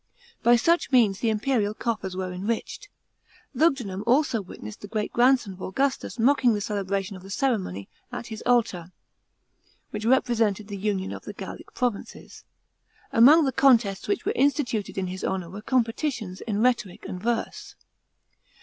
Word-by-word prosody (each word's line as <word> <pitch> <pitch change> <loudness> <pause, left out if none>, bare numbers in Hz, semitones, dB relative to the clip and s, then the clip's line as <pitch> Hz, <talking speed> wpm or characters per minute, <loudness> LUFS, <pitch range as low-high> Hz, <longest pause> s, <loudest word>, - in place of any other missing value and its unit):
By 240 +1 +6
such 335 +8 +2
means 220 -7 +4
the 230 - +1
imperial 215 -1 0
coffers 205 -6 -3
were 185 -1 -3
enriched. 225 - -4 0.6
Lugudunum 245 - +1
also 250 -3 +3
witnessed 105 - -10
the 205 - -8
great 215 0 -3
grand 255 +2 +5
son 200 -5 -8
of 185 - -14
Augustus 270 +10 -1
mocking 245 -1 +3
the - - -2
celebration 200 -1 -2
of 185 - -10
the 190 - -12
ceremony 195 - -1 0.2
at 245 -1 -6
his 220 -1 -7
Altar, 210 -8 +1 1.0
which 210 0 -5
represented 225 -4 +1
the 200 - -5
union 195 -1 -2
of - - -8
the - - -6
Gallic - - -9
provinces. 245 -5 -4 0.7
Among 280 +6 +7
the 265 - +1
contests 230 -8 +3
which 405 - -1
were - - +1
instituted 255 -8 0
in 190 - -1
his 185 +1 -6
honour 185 -3 -2
were 200 +2 -8
competitions 230 -4 -1
in 215 -1 -1
rhetoric 240 -7 0
and 180 - -6
verse. 235 +1 -3
220 Hz, 160 wpm, -25 LUFS, 195-250 Hz, 1.0 s, Among